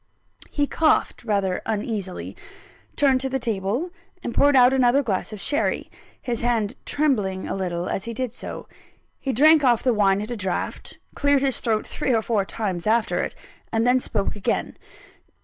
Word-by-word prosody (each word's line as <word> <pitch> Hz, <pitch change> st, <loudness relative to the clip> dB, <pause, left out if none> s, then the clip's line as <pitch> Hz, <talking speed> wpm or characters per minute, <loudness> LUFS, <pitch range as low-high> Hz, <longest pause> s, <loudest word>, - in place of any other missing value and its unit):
He 290 Hz, -, 0 dB
coughed 310 Hz, -2 st, +1 dB
rather 200 Hz, -5 st, 0 dB
uneasily; 210 Hz, -3 st, -3 dB, 0.6 s
turned 270 Hz, -3 st, +3 dB
to 265 Hz, -, -1 dB
the 265 Hz, -, 0 dB
table, 230 Hz, -, -2 dB, 0.3 s
and 235 Hz, -, -3 dB
poured 285 Hz, +3 st, +4 dB
out 250 Hz, 0 st, +6 dB
another 260 Hz, +1 st, +3 dB
glass 200 Hz, -4 st, -2 dB
of 215 Hz, -, -7 dB
sherry 290 Hz, +8 st, -1 dB, 0.3 s
his 235 Hz, -2 st, -3 dB
hand 230 Hz, -2 st, 0 dB
trembling 210 Hz, -11 st, 0 dB
a -, -, -3 dB
little 180 Hz, -2 st, -2 dB
as 195 Hz, -, -3 dB
he 235 Hz, -, -4 dB
did 255 Hz, -1 st, -3 dB
so. -, -, -8 dB, 0.5 s
He 270 Hz, -, -2 dB
drank 305 Hz, +5 st, +5 dB
off 240 Hz, -4 st, +3 dB
the 250 Hz, -, +3 dB
wine 200 Hz, -2 st, +3 dB
at 210 Hz, +3 st, -5 dB
a -, -, -2 dB
draught; 190 Hz, -4 st, -4 dB, 0.2 s
cleared 285 Hz, -1 st, +2 dB
his 270 Hz, -2 st, +1 dB
throat 220 Hz, -3 st, 0 dB
three 260 Hz, -5 st, -1 dB
or 220 Hz, -, +1 dB
four 210 Hz, -4 st, 0 dB
times 195 Hz, -4 st, -3 dB
after 225 Hz, +1 st, +2 dB
it; -, -, -4 dB, 0.4 s
and 225 Hz, +1 st, +1 dB
then 250 Hz, +1 st, +4 dB
spoke 205 Hz, -5 st, -2 dB
again. 205 Hz, -, -2 dB
230 Hz, 175 wpm, -23 LUFS, 205-265 Hz, 0.6 s, out